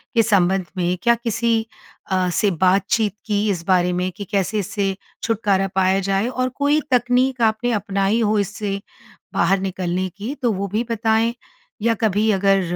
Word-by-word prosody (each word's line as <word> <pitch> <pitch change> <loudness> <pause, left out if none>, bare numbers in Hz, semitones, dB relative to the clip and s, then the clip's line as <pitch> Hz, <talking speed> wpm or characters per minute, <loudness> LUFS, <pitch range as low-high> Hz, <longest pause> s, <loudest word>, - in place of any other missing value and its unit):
के 230 - +5
संबंध 190 -3 +2
में 180 0 0
क्या 235 0 +5
किसी 230 -1 0 0.5
अ, 185 -1 +1
से 200 +3 +1
बातचीत 190 +4 +2
की 210 0 0
इस 175 -4 -2
बारे 180 -1 +3
में? 180 +1 -1
कि 200 +3 -8
कैसे 200 +2 -1
इससे 195 -1 -2 0.3
छुटकारा 200 -4 +1
पाया 190 0 +3
जाए 195 +3 0
और 255 0 -1
कोई 290 +1 +2
तकनीक 250 +1 +2
आपने 225 +2 +2
अपनाई 200 +1 0
हो 215 -1 +2
इससे, 200 0 -3 0.5
बाहर 195 0 +2
निकलने 185 -1 -2
की 220 +7 -4
तो 240 -3 +2
वो 200 +1 -3
भी 215 +5 -1
बताएँ? 225 +1 +1 0.5
या 230 +1 +3
कभी 215 0 +2
अगर 195 0 +3
205 Hz, 165 wpm, -21 LUFS, 190-230 Hz, 0.5 s, के